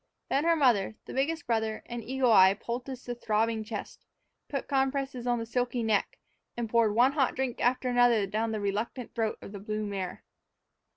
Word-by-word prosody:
Then 285 +3 +1
her 335 0 +4
mother, 235 -9 +3
the - - -8
biggest 315 +5 -1
brother, 220 -2 -1
and 240 -1 -6
Eagle 260 0 +1
Eye 190 -2 +7
poulticed 245 +4 -6
the 245 - -3
throbbing 225 -1 0
chest, 215 -1 -7 0.5
put 275 - -3
compresses 270 -2 -1
on 240 0 +2
the 230 - -3
silky 245 +1 -1
neck, 215 -2 0 0.4
and 235 -1 -2
poured 220 -2 +2
one 245 +3 +5
hot 275 -3 +1
drink 255 -2 -2
after 255 +1 +2
another 245 -4 +4
down 220 +3 -1
the 215 - -2
reluctant 215 +5 -3
throat 225 -2 -1
of - - -9
the 200 - -7
blue 215 +1 -3
mare. 195 -3 -5
235 Hz, 185 wpm, -29 LUFS, 215-255 Hz, 0.5 s, Eye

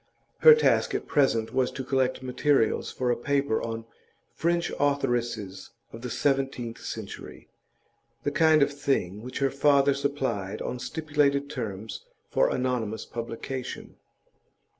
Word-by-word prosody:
Her 465 -1 +9
task 460 - +2
at - - -2
present 115 -6 +2
was 130 -1 +2
to 135 - -4
collect 130 0 0
materials 130 -1 +1
for 125 -1 0
a - - +2
paper 140 -2 0
on 115 0 -4 0.5
'French 170 +1 0
Authoresses 120 -9 -1 0.2
of 115 - -8
the 125 - -5
Seventeenth 135 -4 -1
Century,' - - -8 0.7
the 145 - 0
kind 155 -1 +5
of 145 - -1
thing 135 -9 -1
which 125 +2 -7
her 135 -1 +1
father 140 0 +4
supplied 130 -8 -2
on 125 - -4
stipulated 145 -1 0
terms 110 -5 -5 0.3
for - - +3
anonymous 120 -4 -1
publication. 120 +2 -6
130 Hz, 130 wpm, -27 LUFS, 115-140 Hz, 0.7 s, Her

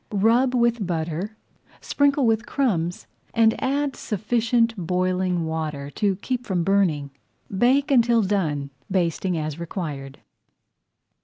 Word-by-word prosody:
Rub 230 +5 +3
with 235 -2 +2
butter, 170 +5 -3 0.4
sprinkle 285 -1 +2
with 225 0 +1
crumbs, 180 -11 -1 0.3
and 225 -1 +5
add 280 +1 0
sufficient 230 +2 0
boiling 180 -1 0
water 155 -3 -4
to 200 +2 0
keep 245 +5 -3
from 180 -3 0
burning. 170 -7 +1 0.4
Bake 260 +7 +3
until 235 -3 +4
done, 155 -8 -1 0.2
basting 180 -1 0
as 155 0 -4
required. 150 -6 -5
195 Hz, 110 wpm, -24 LUFS, 165-235 Hz, 0.4 s, and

